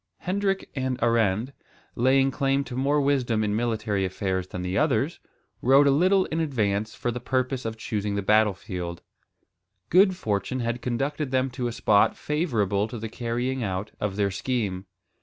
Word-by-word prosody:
Hendrik 195 +1 -1
and 130 -2 -1
Arend, 115 +1 +1 0.4
laying 135 +2 +3
claim 135 0 +1
to 125 - -8
more 140 +3 +2
wisdom 130 -6 +1
in 105 -1 0
military 110 -3 -1
affairs 95 -1 -2
than 90 -1 -6
the 90 +1 -2
others, 140 +1 +1 0.4
rode 135 +3 +6
a 140 - +5
little 185 +6 +3
in 160 - -3
advance 110 -8 -1
for 120 - -2
the 125 - -4
purpose 130 +1 -1
of 110 0 -4
choosing 105 -2 -2
the 100 - -1
battle 105 0 +4
field. 90 -2 -6 0.9
Good 190 +1 +5
fortune 110 - -2
had 120 +1 -2
conducted 135 +4 -2
them 130 0 0
to 125 -1 -3
a - - -2
spot 105 -2 +3
favourable 110 - 0
to 120 - -7
the 110 0 -5
carrying 120 +3 -2
out 95 0 -3
of 105 -2 -2
their 100 -1 +1
scheme. 100 -3 -2
120 Hz, 170 wpm, -26 LUFS, 105-135 Hz, 0.9 s, rode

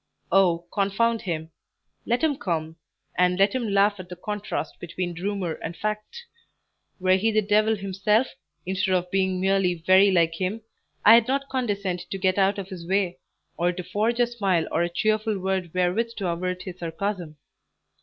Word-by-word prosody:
Oh, 175 -2 +3
confound 220 +3 +1
him! 160 -3 -4 0.6
Let 240 +5 +1
him 310 -3 +3
come, 165 -6 -3 0.4
and 180 0 +3
let 195 +1 +3
him 245 -4 -1
laugh 200 0 +3
at 180 -1 -9
the 180 - -7
contrast 210 +3 -4
between 175 +1 -4
rumour 195 -4 -2
and 165 +1 -5
fact. 215 - -4 0.7
Were 185 0 +4
he 220 +4 +1
the 215 0 +2
devil 215 +2 +3
himself, 200 +4 +1 0.4
instead 190 +1 0
of 180 0 -1
being 190 -1 +1
merely 190 -1 +2
very 185 +4 +5
like 170 -3 +3
him, 185 +6 -3 0.4
I'd 225 +2 +8
not 275 +1 -1
condescend 200 -8 -2
to 195 - -3
get 190 0 +1
out 195 +1 +3
of 195 -1 -6
his 175 -3 -8
way, 190 -2 0 0.4
or 175 +1 +2
to 180 0 -6
forge 220 +6 -1
a 245 - +5
smile 195 -8 0
or 165 - +1
a 175 - +1
cheerful 215 +3 0
word 190 -1 -2
wherewith 185 +7 0
to 190 -4 -1
avert 180 +2 -3
his 185 -1 -8
sarcasm." 170 -1 -4
190 Hz, 175 wpm, -25 LUFS, 180-210 Hz, 0.7 s, I'd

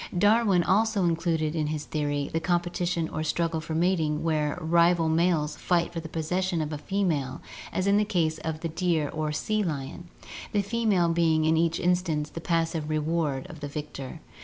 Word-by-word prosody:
Darwin 205 -2 +4
also 210 +2 +2
included 165 -2 0
in 155 -2 0
his 150 -1 -3
theory 145 -2 -1
the 165 - +1
competition 175 -1 0
or 155 - -3
struggle 165 0 -1
for 160 0 -5
mating 160 -3 +1
where 155 -2 0
rival 170 +1 +3
males 160 -2 +1
fight 175 -1 0
for 165 - -3
the 160 -1 -8
possession 175 +3 -1
of 155 0 -2
a - - -3
female 160 -9 -1 0.3
as 185 - -1
in 200 +1 +4
the 210 - +4
case 165 -6 0
of 155 0 -4
the 170 - -1
deer 165 -3 0
or 155 -1 -2
the 150 - -2
sea 215 +6 0
lion, 160 -1 -4 0.5
the 205 -1 +2
female 200 -5 +1
being 165 -2 +2
in 160 +1 +3
each 165 0 +1
instance 175 -4 0
the 165 - -6
passive 165 -2 -1
reward 155 -3 -1
of 160 - -10
the 145 - -5
victor. 150 0 -7
165 Hz, 185 wpm, -27 LUFS, 155-175 Hz, 0.5 s, Darwin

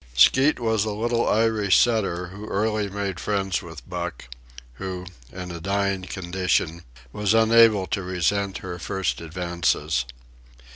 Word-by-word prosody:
Skeet 130 - +5
was 110 -3 +1
a 110 - -2
little 115 +2 0
Irish 110 -3 +3
setter 95 -7 +1
who 100 +3 -9
early 105 0 0
made 100 -2 -3
friends 95 -3 -1
with 80 -7 -11
Buck, - - -5 0.5
who, 90 -1 -4 0.3
in 90 -1 -7
a 85 -1 -7
dying 100 +1 0
condition, 90 -3 -1 0.3
was 105 +1 +1
unable 115 -3 +5
to 100 - -2
resent 95 +2 -1
her 90 -1 -5
first 95 0 -2
advances. 85 -4 -1
95 Hz, 135 wpm, -24 LUFS, 90-105 Hz, 0.5 s, Skeet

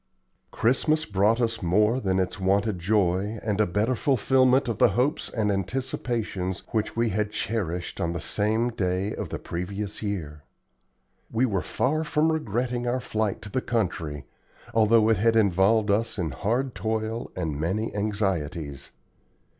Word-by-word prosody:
Christmas 155 +6 +1
brought 105 +4 +2
us 115 -1 -1
more 105 +7 +3
than 95 -6 0
its 95 +1 -1
wonted 100 +1 +1
joy, 100 +2 +1
and 105 -1 0
a 105 - +3
better 105 +8 +1
fulfilment 130 +1 +3
of 115 -4 -2
the - - +7
hopes 135 +5 +1
and 105 -3 0
anticipations 100 -3 -2
which 110 -1 -1
we 115 0 +1
had 105 +1 0
cherished 90 -6 -3
on 85 - 0
the 85 - -3
same 110 +8 0
day 95 -1 -1
of - - -5
the - - -3
previous 100 +4 -5
year. 85 -8 -4 0.9
We 115 +3 +2
were 100 -7 0
far 155 - 0
from 155 +1 +2
regretting 120 -4 -1
our 125 +2 +1
flight 110 -5 -2
to 105 - -7
the 130 - 0
country, 85 - -2 0.5
although 110 0 +5
it 110 -2 +4
had 115 +3 +3
involved 105 +1 +3
us 115 +3 0
in 85 -6 -1
hard 120 - -1
toil 110 +1 -2
and 80 -5 -3
many 95 +8 -1
anxieties. 90 -9 -2
105 Hz, 155 wpm, -26 LUFS, 95-115 Hz, 0.9 s, the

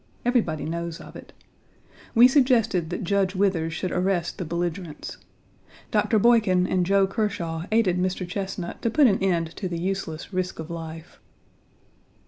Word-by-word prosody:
Everybody 225 - +1
knows 170 +1 -4
of - - -12
it. - - -11 0.8
We 235 +2 +9
suggested 240 - +2
that 175 - -4
Judge 195 0 +1
Withers 185 -4 +1
should 180 +2 -3
arrest 180 -2 -1
the 180 - -3
belligerents. 170 -1 -4 0.7
Dr. 210 +1 +2
Boykin 210 -5 +4
and 185 -1 0
Joe 195 0 +4
Kershaw 190 -5 -2
1 165 +3 -6
aided 205 -5 +2
Mr. 185 0 -1
Chesnut 190 -1 -5
to 230 - +1
put 290 +5 +4
an 205 -6 +4
end 170 -4 0
to 190 - -3
the 170 - -3
useless 185 -2 -4
risk 185 0 -2
of 160 +1 -7
life. 165 -1 -8
185 Hz, 155 wpm, -25 LUFS, 170-200 Hz, 0.8 s, We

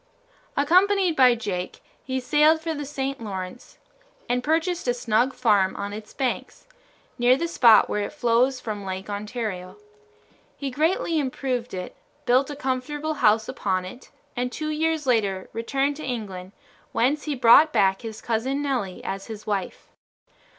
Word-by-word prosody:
Accompanied 365 +4 +3
by 255 -3 +6
Jake, 190 -6 -4 0.2
he 260 0 -2
sailed 300 +5 +4
for 325 0 -3
the 290 -2 -5
St. 275 -2 -4
Lawrence 190 +1 -7 0.5
and 245 +1 0
purchased 325 +2 0
a 245 - +2
snug 240 +2 +1
farm 205 -6 +2
on 200 0 -5
its 215 0 -8
banks, 265 -3 -3 0.5
near 245 +2 +5
the 335 - -1
spot 235 -9 +6
where 210 - -1
it 205 - -3
flows 255 -1 +2
from 210 -4 -5
Lake 190 +1 -5
Ontario. 205 -3 -5 0.8
He 275 -2 -4
greatly 320 +3 +1
improved 255 -4 -3
it, 180 - -6 0.3
built 260 +3 +3
a 290 - -5
comfortable 290 +3 -2
house 220 -6 +3
upon 190 -8 -2
it, 245 +8 -11 0.3
and 250 0 -2
two 310 +3 -3
years 315 0 0
later 205 -7 0
returned 270 +5 -1
to 310 - -8
England, 200 -6 -5 0.4
whence 280 +6 +1
he 300 -2 -2
brought 260 +5 +6
back 195 -7 +2
his 220 -1 -7
Cousin 245 +5 -1
Nelly 250 -10 -2
as 195 0 -5
his 215 -2 -8
wife. 200 -3 -4
250 Hz, 155 wpm, -24 LUFS, 210-290 Hz, 0.8 s, by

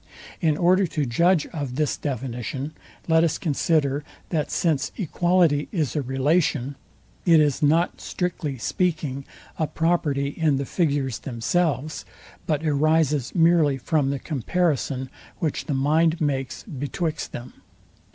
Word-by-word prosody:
In 155 -3 +2
order 185 +2 +4
to 150 -2 -1
judge 170 +7 +3
of 140 -6 -4
this 150 +1 0
definition 130 +1 -4 0.4
let 160 0 +4
us 165 - +1
consider, 150 -3 +1 0.3
that 155 -4 -1
since 155 -6 0
equality 175 -5 +2
is 155 - -1
a 150 - +1
relation, 140 +1 +1 0.5
it 165 -3 +6
is 150 -2 +2
not, 160 +4 +2
strictly 165 -6 -3
speaking, 150 -2 -1 0.3
a 155 - +1
property 155 -5 0
in 150 0 +1
the 140 - -2
figures 140 - 0
themselves, 145 +5 -1 0.4
but 155 0 0
arises 150 -2 +2
merely 165 -5 +4
from 140 +2 0
the 140 - -1
comparison, 140 - -1 0.3
which 155 -4 -2
the 145 - -1
mind 160 +5 +2
makes 135 -4 -2
betwixt 155 - -3
them. 120 +1 -9
150 Hz, 130 wpm, -24 LUFS, 135-165 Hz, 0.5 s, it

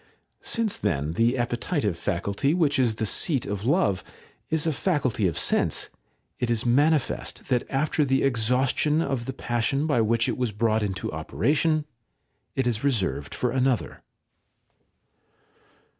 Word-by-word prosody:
Since, 230 -3 0
then, 75 0 -1
the 115 +7 +2
appetitive 120 - -1
faculty, 100 - -1
which 145 -6 +2
is 120 -4 +2
the 110 - -2
seat 135 - +1
of 100 +1 -4
love, 115 - +2 0.5
is 160 -1 +1
a 160 - +1
faculty 135 - 0
of 85 - -2
sense, - - +1 0.5
it 125 - -1
is 115 0 +1
manifest 145 +4 +1
that 125 -1 0
after 150 +2 +1
the 135 -1 +1
exhaustion 130 +5 +2
of 135 -5 -2
the 135 - -4
passion 125 +4 -1
by 145 -7 +2
which 115 +1 +1
it - - -2
was 125 -3 0
brought 110 +1 +1
into 95 -4 -3
operation 150 - 0 0.7
it 135 - 0
is 115 -1 -1
reserved 100 - -1
for 125 - 0
another. 130 -1 0
125 Hz, 145 wpm, -25 LUFS, 110-145 Hz, 0.7 s, the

